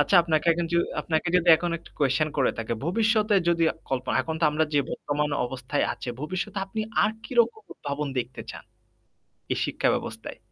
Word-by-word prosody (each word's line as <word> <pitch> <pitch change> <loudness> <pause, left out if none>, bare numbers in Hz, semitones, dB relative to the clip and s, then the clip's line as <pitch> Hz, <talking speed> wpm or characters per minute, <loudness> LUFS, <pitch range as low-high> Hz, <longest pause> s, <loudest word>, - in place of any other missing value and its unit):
আচ্ছা 145 +6 +4
আপনাকে 160 -1 0
এক 170 - -5 0.4
আপনাকে 160 -1 -1
যদি 180 -1 +1
এখন 175 +1 -2
একটা - - -18
কুয়েসশন 140 +2 +2
করে 130 - +3
থাকি। 115 +1 -2
ভবিষ্যতে 215 +2 +2
যদি 170 -1 +3 0.3
কল্পনা 130 -1 0
এখন 160 +4 -4
তো - - +3
আমরা 155 +1 +2
যে 145 - +5
বর্তমান 150 +1 -1 0.2
অবস্থায় 130 +3 -2
আছে, - - -8
"ভবিষ্যতে 185 +4 -3
আপনি 220 +3 -4 0.2
আর - - +3
কিরকম 235 -3 +2
উদ্ভাবন 145 0 -4
দেখতে 125 +1 -4
চান?" - - -10 0.9
এই - - +1
শিক্ষাব্যবস্থায়। - - -2
160 Hz, 165 wpm, -26 LUFS, 140-185 Hz, 0.9 s, যে